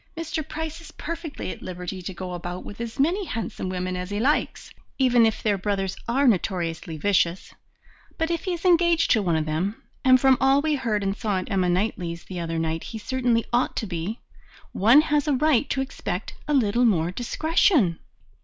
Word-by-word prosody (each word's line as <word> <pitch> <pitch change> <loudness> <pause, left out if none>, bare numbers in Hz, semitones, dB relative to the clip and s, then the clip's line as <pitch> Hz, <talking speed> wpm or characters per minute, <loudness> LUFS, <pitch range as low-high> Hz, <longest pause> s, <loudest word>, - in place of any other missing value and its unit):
Mr. 325 -1 -3
Price 320 +2 -6
is 330 - -12
perfectly 330 - -6
at - - -9
liberty 180 +1 -6
to 180 - -5
go 180 0 -6
about 175 +1 -6
with 205 +3 -8
as 230 -1 -5
many 355 +8 +2
handsome 225 - -4
women 185 0 -3
as 180 0 -4
he 205 0 -2
likes, 275 +7 0 0.3
even 245 -3 +5
if 220 - -3
their 205 -3 +1
brothers 195 -1 -1
are 265 +4 +2
notoriously 170 -6 0
vicious, 180 0 +1 0.6
but 325 +1 0
if 335 - -2
he 370 - 0
is 345 +1 -6
engaged 340 -2 +4
to 220 - +4
one 175 -4 +1
of 155 -1 0
them 175 +8 -2 0.2
and 255 -1 +6
from 265 0 +4
all 270 +1 +5
we 305 +1 0
heard 230 -7 -1
and 195 0 -1
saw 205 -3 -1
at 185 +4 -4
Emma 185 -2 +2
Knightley's 175 -3 -1
the 180 -2 -7
other 165 -1 -3
night 160 0 -2
he 225 - -6
certainly 240 0 0
ought 245 +1 +1
to 225 - -2
be 185 +3 -4 0.5
one 230 +9 +6
has 300 -1 0
a 295 - +3
right 285 -1 +2
to 265 - 0
expect 265 - -4
a 300 - 0
little 240 -1 +2
more 175 -6 +2
discretion." 245 - +2
220 Hz, 200 wpm, -25 LUFS, 180-280 Hz, 0.6 s, and